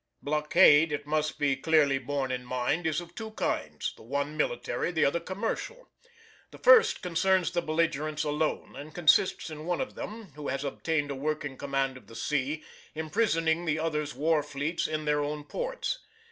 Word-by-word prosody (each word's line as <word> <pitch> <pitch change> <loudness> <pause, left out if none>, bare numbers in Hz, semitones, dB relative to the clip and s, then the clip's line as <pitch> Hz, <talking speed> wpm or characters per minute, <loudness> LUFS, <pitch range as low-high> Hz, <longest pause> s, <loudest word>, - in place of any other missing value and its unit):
Blockade, 150 +1 +5
it 145 -1 -3
must 155 +1 -1
be 140 -2 +2
clearly 140 -1 +3
borne 135 0 -2
in 125 0 -3
mind, 130 +7 -1
is 160 +1 0
of 175 0 -12
two 220 +3 -6
kinds, - - -2
the - - -17
one 140 +6 -2
military, 120 +1 -1
the 160 -2 +2
other 140 +5 +2
commercial. 225 - -4 0.6
The - - -13
first - - +6
concerns 180 +1 +2
the 175 - 0
belligerents 155 -1 0
alone, 150 +1 -1
and 150 +2 -9
consists 175 0 +3
in 155 +1 -7
one 175 - 0
of 265 - -3
them, 215 -4 -7
who 150 0 -7
has 135 +1 -2
obtained 145 +1 -1
a - - -3
working 150 0 -3
command 135 -1 -1
of - - -17
the 115 - -13
sea, 150 +3 -1 0.3
imprisoning 165 0 +1
the 155 -1 +1
other's 150 -2 -2
war 155 0 +2
fleets 145 +3 -2
in 155 -1 -3
their 150 0 +2
own 150 0 -3
ports. - - -3
155 Hz, 175 wpm, -29 LUFS, 145-170 Hz, 0.6 s, first